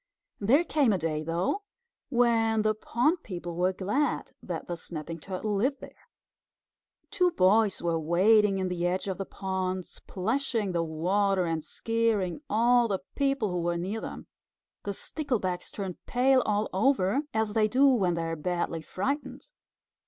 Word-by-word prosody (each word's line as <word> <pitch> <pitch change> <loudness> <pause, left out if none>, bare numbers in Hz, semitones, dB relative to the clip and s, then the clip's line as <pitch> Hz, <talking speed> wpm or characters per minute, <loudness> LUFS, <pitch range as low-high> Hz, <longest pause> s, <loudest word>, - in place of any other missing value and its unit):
There 255 +11 +4
came 295 -7 +2
a - - +1
day, 155 -2 -2
though, 170 - -1 0.5
when 230 -3 +3
the 215 0 +3
pond 250 - 0
people 175 - -6
were 180 +2 +2
glad 200 +11 -1
that - - -5
the 175 - -3
Snapping 165 0 -7
Turtle 195 +5 -3
lived 260 +8 0
there. - - -14 1.0
Two 365 -3 +3
boys 205 - +3
were 165 -1 +1
wading 195 +5 +4
in 190 -1 -1
the 175 -1 -1
edge 185 +2 -1
of 190 0 -3
the 195 - -4
pond, 185 -1 -3
splashing 225 +1 -2
the 170 -1 0
water 185 +4 +1
and 165 -2 -2
scaring 225 - -1
all 240 +2 +4
the 195 -3 -2
people 275 -7 0
who 180 -1 -1
were 170 0 0
near 195 +6 -3
them. - - -7 0.6
The 200 -1 -3
Sticklebacks 210 - -3
turned 190 -4 -6
pale 260 +1 +4
all 210 0 +1
over, 200 +1 +2
as 220 -1 0
they 215 -1 +3
do 260 +5 +3
when 200 -11 +3
they 165 - -2
are 165 0 -2
badly 170 0 -2
frightened. 275 - -4
200 Hz, 160 wpm, -28 LUFS, 180-235 Hz, 1.0 s, There